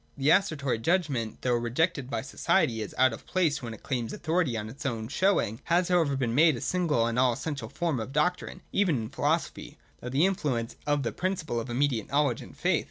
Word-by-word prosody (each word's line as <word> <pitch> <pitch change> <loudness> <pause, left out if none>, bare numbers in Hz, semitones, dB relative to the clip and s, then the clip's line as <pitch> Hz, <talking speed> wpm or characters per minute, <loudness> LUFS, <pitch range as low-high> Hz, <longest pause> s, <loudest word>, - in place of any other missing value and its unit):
The 140 +2 +3
Assertory 145 - +2
judgment, 140 -6 0
although 120 -1 +2
rejected 130 +3 0
by 115 -3 -2
society 110 -2 +1
as 105 - -6
out 130 -2 +4
of - - -10
place 160 -6 +1
when 115 -3 -6
it - - -18
claims 120 -4 -2
authority 160 -7 0
on 105 0 -4
its 130 +7 -9
own 115 -5 -2
show 190 +7 +3
ing, 110 +3 -3
has 175 +1 +2
however 165 -6 +2
been 125 -4 -1
made 155 +3 +5
the 120 - -6
single 165 -10 +1
and 115 +1 0
all 125 -1 +4
essential 135 -3 -5
form 165 -5 -1
of 110 +4 -5
doctrine, 180 +4 -1
even 190 -6 +2
in 110 -1 -5
philosophy, 150 +5 -2 0.2
through 125 - -6
the 140 +7 +3
in 195 - +3
fluence 120 -10 -2
of 145 -1 +1
the 115 - -1
principle 180 -9 -2
of 115 - -6
immediate 125 -3 0
knowledge 145 +1 +1
and - - -12
faith. - - +2
140 Hz, 220 wpm, -28 LUFS, 120-165 Hz, 0.2 s, made